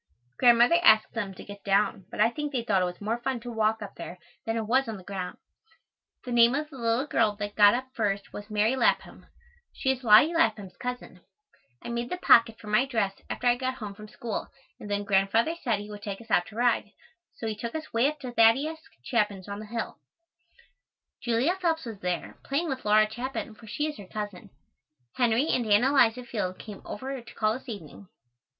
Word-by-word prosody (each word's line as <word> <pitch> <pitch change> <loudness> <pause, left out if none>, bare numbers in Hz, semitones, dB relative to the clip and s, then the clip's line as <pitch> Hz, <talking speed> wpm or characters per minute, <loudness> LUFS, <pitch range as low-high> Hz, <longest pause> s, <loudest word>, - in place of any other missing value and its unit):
Grandmother 245 +7 +6
asked 220 -8 +5
them 200 -5 -4
to - - -10
get 205 0 -11
down, 200 -1 +1
but - - -9
I 220 +2 +4
think 295 +3 -4
they 250 -4 -1
thought 200 -4 +2
it - - +2
was 180 0 -5
more 220 +3 -2
fun 260 0 -2
to 240 +1 -7
walk 220 -1 0
up 200 - -8
there 175 +1 -7 0.3
than 225 0 0
it 225 - -2
was 260 +4 +2
on 220 -2 -4
the 185 - -12
ground. 185 -2 -5 0.9
The 250 - -5
name 240 +1 +5
of 300 +1 -3
the 270 - -10
little 230 +3 +1
girl 215 -7 +1
that 205 0 -5
got 205 +1 +7
up 260 +1 -4
first 200 -3 -2
was 205 +1 -8
Mary 215 +4 +2
Lapham. 245 -3 0 0.4
She 265 - 0
is 260 -1 -4
Lottie 235 +9 +7
Lapham's 215 - +1
cousin. 250 0 -6 0.6
I - - -6
made 235 +1 -3
the 360 - -3
pocket 230 -9 +5
for 225 - -13
my 215 +5 +2
dress 220 -7 0 0.2
after - - -5
I 245 0 +5
got 255 +1 -2
home 210 -5 -7
from 215 +1 -11
school 225 0 -5 0.3
and 205 - -9
then 205 0 -1
Grandfather 200 +8 +2
said 230 -5 +1
he 205 +1 -8
would 205 -1 -9
take 200 -1 -5
us 230 0 -13
out 175 - +3
to 215 - -13
ride, 235 -3 +1 0.4
so - - -7
he 220 -1 -2
took 230 +4 -6
us 315 0 -6
way 230 +4 +3
up 305 +1 -3
to 255 -3 -5
Thaddeus 265 +8 +3 0.2
Chapin's 210 -6 -1
on 200 0 -5
the 215 - -8
hill. 230 +1 -5 1.2
Julia 255 +9 +1
Phelps 325 -4 0
was 225 -4 -7
there, 180 -2 -4
playing 305 +5 -1
with 265 -3 -4
Laura 215 +1 +5
Chapin, 240 +1 -5
for 220 +1 -15
she 295 +8 -2
is 305 -1 -4
her 200 - -10
cousin. 205 -3 -6 0.6
Henry 245 +4 +2
and 240 -3 +1
Ann 210 +2 +5
Eliza 250 -3 +3
Field 205 -6 -3
came 210 -3 -10
over 265 +3 -5
to 235 - -14
call 215 0 +1
this 255 +2 -8
evening. 200 -2 -9
225 Hz, 215 wpm, -27 LUFS, 205-250 Hz, 1.2 s, got